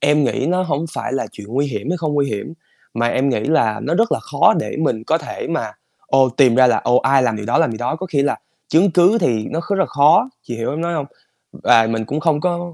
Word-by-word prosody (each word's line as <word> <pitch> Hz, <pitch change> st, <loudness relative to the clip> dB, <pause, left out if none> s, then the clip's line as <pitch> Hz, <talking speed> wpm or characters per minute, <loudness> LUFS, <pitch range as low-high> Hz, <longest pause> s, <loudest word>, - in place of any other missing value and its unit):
Em 150 Hz, 0 st, +2 dB
nghĩ 130 Hz, +2 st, -1 dB
nó 185 Hz, +1 st, +1 dB
hổng 155 Hz, -2 st, -2 dB
phải -, -, -4 dB
là 135 Hz, -, -2 dB
chuyện 105 Hz, -1 st, -11 dB
nguy 140 Hz, +5 st, -1 dB
hiểm 120 Hz, +1 st, -5 dB
hay 180 Hz, -, 0 dB
không 155 Hz, -3 st, -3 dB
nguy 140 Hz, -1 st, +1 dB
hiểm, 105 Hz, +8 st, -5 dB, 0.4 s
mà 115 Hz, +1 st, 0 dB
em 130 Hz, +3 st, 0 dB
nghĩ 120 Hz, -, 0 dB
là 135 Hz, -8 st, +1 dB
nó 155 Hz, -, -1 dB
rất 225 Hz, +5 st, +1 dB
là -, -, -1 dB
khó -, -, +2 dB
để -, -, -5 dB
mình 120 Hz, -8 st, -1 dB
có -, -, +1 dB
thể -, -, -7 dB
mà, -, -, -3 dB, 0.3 s
ồ, 135 Hz, -1 st, +3 dB
tìm 125 Hz, -1 st, +3 dB
ra 130 Hz, 0 st, +5 dB
là, -, -, +2 dB
ồ, 125 Hz, -, +3 dB
ai 135 Hz, 0 st, +3 dB
làm 115 Hz, -3 st, 0 dB
điều 105 Hz, -1 st, -7 dB
đó, -, -, +1 dB
làm -, -, +2 dB
gì 110 Hz, -, -7 dB
đó, 125 Hz, +6 st, -2 dB
có 185 Hz, +3 st, -6 dB
khi 145 Hz, -5 st, 0 dB
là 145 Hz, -, -1 dB, 0.3 s
chứng 175 Hz, +4 st, +3 dB
cứ 180 Hz, +6 st, +4 dB
thì 110 Hz, -3 st, 0 dB
nó 160 Hz, -, -2 dB
kh 185 Hz, -, -5 dB
là 195 Hz, -1 st, +1 dB
khó, 150 Hz, -, +3 dB
chị 120 Hz, -, -7 dB
hiểu 115 Hz, -, -3 dB
em 150 Hz, +3 st, -4 dB
nói 170 Hz, 0 st, -2 dB
hông? 145 Hz, -3 st, -3 dB, 0.5 s
Và 115 Hz, -1 st, +3 dB
mình 110 Hz, -1 st, -2 dB
cũng 145 Hz, +6 st, -3 dB
không 155 Hz, -2 st, +1 dB
có 175 Hz, -1 st, -2 dB
140 Hz, 275 wpm, -18 LUFS, 120-165 Hz, 0.5 s, ra